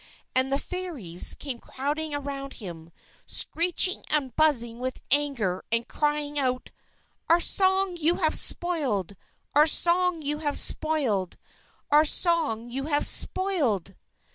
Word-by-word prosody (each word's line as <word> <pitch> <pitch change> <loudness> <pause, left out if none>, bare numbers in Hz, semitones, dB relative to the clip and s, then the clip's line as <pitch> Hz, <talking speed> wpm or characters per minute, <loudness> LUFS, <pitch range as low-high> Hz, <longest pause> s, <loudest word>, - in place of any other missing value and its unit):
And 260 +1 +3
the 275 - +1
Fairies 285 - -2
came 265 -5 -7
crowding 290 +4 -5
around 275 -1 -6
him, 170 -5 -10 0.4
screeching 355 +2 +2
and 280 -4 -2
buzzing 240 -7 +2
with 255 +1 -5
anger, 270 -11 -1
and 230 0 0
crying 295 -1 -2
out: 255 -2 -3 0.6
"_Our 335 +1 +4
song 380 0 +2
you 335 +1 +1
have 315 -4 +1
spoiled! 260 - +2 0.4
Our 300 +2 +4
song 345 0 +3
you 295 +1 -3
have 290 -2 -2
spoiled! 255 - 0 0.5
Our 300 +1 +5
song 295 -9 +1
you 270 +2 -5
have 290 -1 +1
spoiled! 285 - +1
290 Hz, 125 wpm, -25 LUFS, 245-325 Hz, 0.6 s, Our